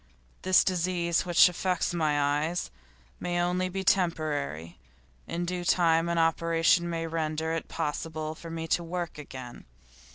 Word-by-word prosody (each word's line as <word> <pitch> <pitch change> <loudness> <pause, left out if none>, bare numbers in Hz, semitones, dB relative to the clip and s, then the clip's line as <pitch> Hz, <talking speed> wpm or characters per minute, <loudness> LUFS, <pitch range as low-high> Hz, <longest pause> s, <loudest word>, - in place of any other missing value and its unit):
This 185 0 +5
disease 175 -1 0
which 175 +1 +7
affects 180 0 -1
my 155 -3 +1 0.3
eyes 175 - -4 0.5
may 175 0 -3
be - - +1
only 180 +2 -1
temporary; 150 - 0 0.5
in 175 +1 -3
due 180 0 -3
time 170 -2 +3
an 170 - 0
operation 165 +1 +2
may 165 -1 -2
render 160 0 -2
it 165 - -3
possible 155 +1 -3
for 165 +1 -10
me 165 0 -5
to 170 - +1
work 170 -2 -4
again. 130 -4 -9
170 Hz, 140 wpm, -28 LUFS, 160-175 Hz, 0.5 s, which